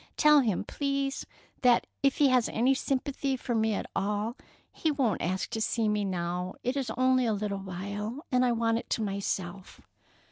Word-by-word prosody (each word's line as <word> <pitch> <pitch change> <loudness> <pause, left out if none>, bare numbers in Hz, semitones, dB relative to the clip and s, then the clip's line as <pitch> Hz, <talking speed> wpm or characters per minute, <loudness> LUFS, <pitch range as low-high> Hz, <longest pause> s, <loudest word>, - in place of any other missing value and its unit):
Tell 300 -1 +7
him, 220 -9 +1
please, 275 -1 -2 0.3
that 245 -2 +5 0.2
if 275 -1 +2
he 285 -2 +5
has 250 -2 +3
any 250 +4 +3
sympathy 270 0 -1
for 245 - -3
me 220 -1 +2
at - - -3
all, 210 +3 -1 0.4
he 320 - 0
won't 270 -8 +1
ask 185 +2 -2
to 220 - -2
see 225 0 +1
me 210 -1 +1
now. 180 0 -2
It 250 +2 -1
is 275 -3 -2
only 255 -1 +3
a 220 - +2
little 200 -1 -2
while, 200 - -5
and 250 0 +3
I 250 - +3
want 230 -1 +1
it - - -11
to 225 - 0
myself." 195 -2 -4
230 Hz, 185 wpm, -29 LUFS, 200-265 Hz, 0.4 s, Tell